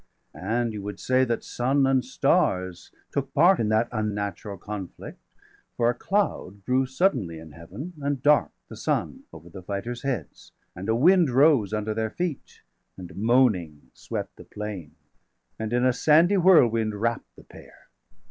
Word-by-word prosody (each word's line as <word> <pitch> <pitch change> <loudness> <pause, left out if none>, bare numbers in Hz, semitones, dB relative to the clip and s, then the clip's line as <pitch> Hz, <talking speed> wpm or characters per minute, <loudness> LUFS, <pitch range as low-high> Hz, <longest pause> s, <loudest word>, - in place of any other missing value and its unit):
And 115 +4 -2
you 105 - -6
would 100 -1 -7
say 130 0 +2
that 115 -2 -2
sun 135 +3 0
and 135 -1 +2
stars 95 -7 0 0.2
took 140 -1 -3
part 175 +6 +5
480 - - -1
In 105 - 0
that 110 +2 +1 0.5
unnatural° 100 +1 -9
conflict; 100 -2 -8 0.6
for 120 0 +3
a - - -8
cloud° 195 - -1
°481 100 -1 -23
Grew 130 +1 +2
suddenly 130 - 0
in 80 -1 -12
Heaven, 95 - -9
and 140 -1 -1
dark'd 150 0 +4 0.2
the - - -10
sun - - -2
Over 80 +1 -13
the 95 - -9
fighters' 100 +6 -5
heads; 125 - -5 0.2
and 95 +4 -6
a 110 - +3
wind 170 +5 +4
rose 130 -5 +4
Under 105 0 -2
their 110 0 -2
feet, 175 +1 -5 0.3
and 90 -2 -10
moaning 100 - +1
swept - - -6
the - - -11
plain, 100 -8 -7 0.6
And 110 0 -4
in 125 +1 +1
a 130 - +3
sandy 160 +9 +4
whirlwind 115 - +4
wrapp'd 115 +3 -3
the - - -16
pair. - - -17
115 Hz, 165 wpm, -25 LUFS, 100-135 Hz, 0.6 s, part